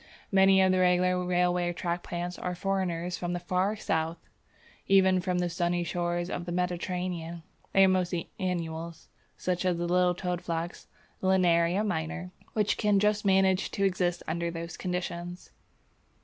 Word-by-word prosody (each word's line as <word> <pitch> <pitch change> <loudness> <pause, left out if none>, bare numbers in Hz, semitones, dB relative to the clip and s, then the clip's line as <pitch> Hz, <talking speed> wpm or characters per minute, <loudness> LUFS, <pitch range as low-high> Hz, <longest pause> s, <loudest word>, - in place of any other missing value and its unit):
Many 190 0 +6
of 190 - +4
the 185 - +2
regular 180 0 +3
railway 180 0 +1
track 175 0 -2
plants 175 +1 -5
are 180 0 -3
foreigners 180 -2 -2
from 175 0 -2
the 175 - -2
far 185 +4 0
south, 165 -5 -1 0.7
even 190 -1 +5
from 180 0 -1
the 180 0 +1
sunny 175 0 0
shores 175 0 -1
of 175 -1 -4
the 175 - -5
Mediterranean. 180 -1 -3 0.3
They 195 - +6
are - - +7
mostly 180 -2 0
annuals, 170 -3 -4 0.3
such 180 0 -1
as 180 -2 +1
the 175 - -2
little 180 0 +3
Toadflax 175 -2 -3 0.3
(Linaria 180 +1 +3
minor), 180 0 -3 0.2
which 210 -2 +1
can 210 -2 +3
just 210 +1 +1
manage 190 -1 +3
to 200 - -2
exist 180 -2 0
under 170 +1 -1
those 170 0 -6
conditions. 175 -1 -4
180 Hz, 150 wpm, -29 LUFS, 175-185 Hz, 0.7 s, are